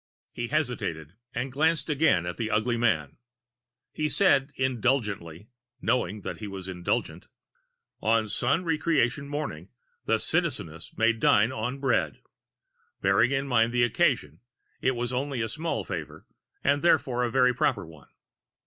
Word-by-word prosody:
He 120 - -4
hesitated 105 - -2 0.2
and 130 +2 -3
glanced 155 +1 +1
again 150 - +2
at 85 - -4
the 110 -2 -2
ugly 110 +3 +1
man. 100 -12 0 0.7
He 155 0 -1
said 140 -8 +3
indulgently, 115 - -1 0.3
knowing 110 -5 0
that - - -6
he 105 - -6
was 95 -2 -7
indulgent: 90 -2 -2 0.7
"On 110 0 +2
Sun 130 - 0
Re 165 -3 0
creation 140 -3 +1
Morning, 150 +1 -4 0.4
the - - +2
Citizeness 120 - -2
may 115 +1 +4
dine 110 0 +3
on 125 +2 -3
bread." 135 -2 0 0.8
Bearing 100 +5 +4
in 135 0 -1
mind 115 -3 +3
the 120 0 +2
occasion, 80 -9 +1 0.4
it 130 0 +1
was 120 +1 -2
only 135 0 -2
a - - -1
small 160 +7 -3
favor 80 -6 -6 0.4
and 140 +1 +2
therefore 125 -7 +2
a 120 - 0
very 125 0 +3
proper 100 -5 0
one. 75 -6 -15
120 Hz, 145 wpm, -27 LUFS, 100-135 Hz, 0.8 s, may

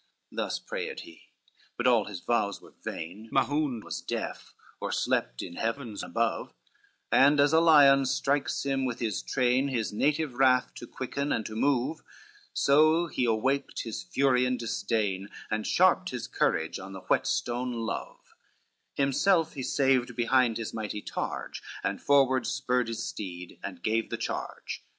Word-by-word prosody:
CXIV - - -24
Thus - - -1
prayed 470 -2 -5
he, - - -15 0.5
but - - -2
all 120 -4 +4
his 95 -4 -7
vows 105 -4 0
were - - -17
vain, 100 +8 -6
Mahound 135 -4 +1
was - - -5
deaf, - - -5 0.2
or - - -3
slept - - 0
in 85 - -8
heavens 115 -2 -3
above, - - -2 0.6
And 145 +2 +5
as 145 +2 +4
a 160 - +7
lion 140 -5 +6
strikes 140 +3 0
him 135 -1 0
with 125 -2 -2
his 115 -3 -2
train, 130 +1 +1
His 120 -6 -2
native 150 +4 +1
wrath 125 0 +3
to 120 - -8
quicken 140 +2 -3
and 110 - 0
to 110 - -6
move, 140 +5 +1 0.5
So 155 +4 +4
he 130 -6 -1
awaked 130 +5 0
his 115 -2 -5
fury 130 -2 +2
and 125 0 +1
disdain, 105 -4 -1 0.2
And 110 0 -1
sharped 185 0 +3
his 125 -2 -4
courage 80 -8 0
on 95 +1 -9
the 95 - -8
whetstone 125 +5 0
love; 115 -1 -5 0.6
Himself 160 +5 +2
he 140 - -5
saved 130 -2 +1
behind 120 -1 +3
his 115 -2 -5
mighty 105 -2 -4
targe, - - -4 0.2
And - - -2
forward 135 -2 +3
spurred 125 -1 0
his 115 -1 -4
steed 90 -3 -7
and 90 -3 -7
gave 110 0 0
the - - -3
charge. - - -5
125 Hz, 160 wpm, -28 LUFS, 110-140 Hz, 0.6 s, a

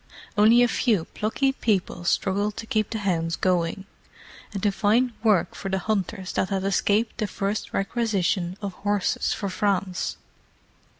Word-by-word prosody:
Only 225 +3 +6
a - - +5
few 220 -7 +1
plucky 245 +6 0
people 200 -8 -1
struggled 200 +4 0
to - - -5
keep 215 -2 0
the 225 - -3
hounds 170 -5 0
going, 180 +1 0 0.7
and 200 -3 -5
to 205 - +3
find 225 +5 +2
work 215 -5 +3
for 195 - -5
the 190 - 0
hunters 195 -1 -2
that 185 - 0
had 195 -2 -1
escaped 205 +4 +1
the 215 - 0
first 200 +2 -3
requisition 195 -4 0
of 200 -2 -3
horses 205 0 0
for 200 - -2
France. 190 -1 -1
200 Hz, 155 wpm, -25 LUFS, 190-215 Hz, 0.7 s, Only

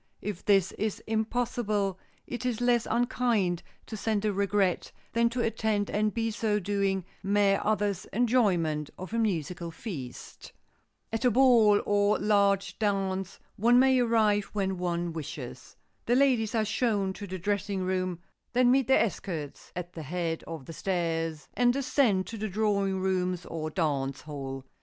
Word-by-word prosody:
If 205 -3 -4
this 195 -3 +3
is 215 -1 -1
impossible, 220 -3 -1 0.3
it 245 0 -5
is 245 -3 -1
less 245 -1 +2
unkind 235 -7 +1 0.2
to 220 - -7
send 215 0 -1
a 210 - +1
regret 200 -2 +1 0.2
than 235 0 +3
to 240 +1 -2
attend 220 -2 0
and 215 +1 +1
by 225 +1 -1
so 215 -1 0
doing 195 -1 0 0.2
mar 200 0 +2
others' 205 -3 0
enjoyment 190 - +1
of 185 +4 -8
a 230 - +1
musical 175 -5 -1
feast. 160 - -8 0.6
At 225 - -1
a 250 - +5
ball 230 -4 +5
or 205 0 +3
large 200 -1 +2
dance, 195 -2 -1 0.2
one 235 +4 +5
may 260 0 +5
arrive 220 -4 +3
when 190 -3 -1
one 175 -1 -1
wishes. 150 -2 -7 0.3
The 240 - +3
ladies 250 -5 +3
are 220 -1 +2
shown 210 -3 0
to 205 +1 -8
the 185 0 -5
dressing 200 +1 -1
room, 185 -2 -1 0.3
then 245 0 +4
meet 265 -2 +3
their 265 -3 +5
escorts 165 -8 -6
at 180 0 -6
the 165 - -7
head 165 +2 -3
of 160 -5 -7
the 165 - -8
stairs 165 -4 -2
and 245 0 +3
descend 250 -7 +2
to 225 +3 -7
the 215 0 -2
drawing 200 -1 0
rooms 185 -2 -1
or 155 -1 -4
dance 140 -5 -1
hall. 135 -3 -6
200 Hz, 155 wpm, -28 LUFS, 180-225 Hz, 0.6 s, a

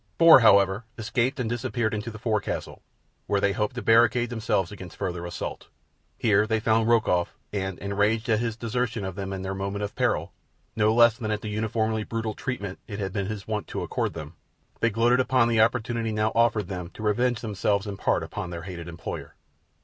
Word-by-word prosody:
Four, 165 -4 +9
however, 100 -1 +4
escaped 125 +5 -1
and 125 - -1
disappeared 120 -1 -1
into 105 +2 -3
the 105 - -8
forecastle, 110 -2 -2 0.5
where 100 - +2
they 100 0 +2
hoped 105 +5 -2
to 125 - -4
barricade 120 +1 +4
themselves 105 -5 0
against 95 -4 -10
further 90 -3 -3
assault. 85 - -6 0.5
Here 105 -1 +3
they 110 0 +1
found 110 0 +2
Rokoff, 110 -7 +2 0.2
and, 95 -2 -2
enraged 105 +3 0
at 110 -2 +2
his 115 -2 -2
desertion 115 -2 -2
of 95 - -4
them 95 0 -5
in 95 -1 -4
their 95 0 -3
moment 100 +1 -3
of 100 - -4
peril, - - 0 0.4
no 110 0 +3
less 115 0 +5
than 110 -3 -3
at 105 -1 -1
the 105 - -5
uniformly 110 +1 -1
brutal 110 0 -3
treatment 100 -8 -5
it 100 - -6
had 95 -2 -3
been 100 -2 -2
his 105 -2 -6
wont 110 -1 -3
to - - -4
accord - - -2
them, 75 -1 -7 0.5
they 115 - +3
gloated 120 +3 +3
upon 130 -2 +3
the 115 -2 +3
opportunity 115 0 +1
now 110 0 +1
offered 115 -4 +2
them 90 -2 -5
to 110 - -8
revenge 120 +3 +1
themselves 100 -1 0
in 100 -1 -4
part - - 0
upon 90 - -5
their 85 -1 -6
hated 85 -2 -7
employer. 85 -1 -7
110 Hz, 200 wpm, -26 LUFS, 100-115 Hz, 0.5 s, Four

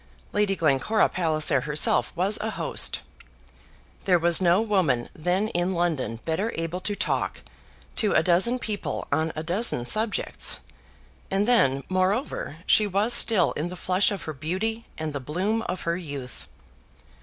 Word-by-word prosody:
Lady 205 -1 +1
Glencora 160 +7 +2
Palliser 155 -5 +1
herself 150 +2 +1
was 190 +4 +1
a 220 - -2
host. - - 0 1.0
There 180 -2 +4
was 170 +1 +4
no 175 +1 +4
woman 185 - +1
then 180 +6 -1
in 175 0 -1
London 155 - -1
better 190 +8 -1
able 165 +2 -3
to 205 +2 -1
talk - - -2 0.6
to 210 - +2
a - - +4
dozen 185 +9 +3
people 215 -4 -4
on 160 +1 +1
a 155 - -4
dozen 175 - 0
subjects; 215 - +1 0.7
and 195 +2 +1
then, 140 - +3
moreover, 185 - -1
she 215 - +4
was 205 +5 +1
still 215 -6 +4
in 160 +4 -3
the 180 - -7
flush 185 +2 +2
of 200 -4 -5
her 155 - -5
beauty 190 - -3
and 155 -2 -4
the 140 - -3
bloom 185 - -1
of 180 - -3
her 170 0 -1
youth. 140 -8 -8
180 Hz, 155 wpm, -25 LUFS, 155-205 Hz, 1.0 s, There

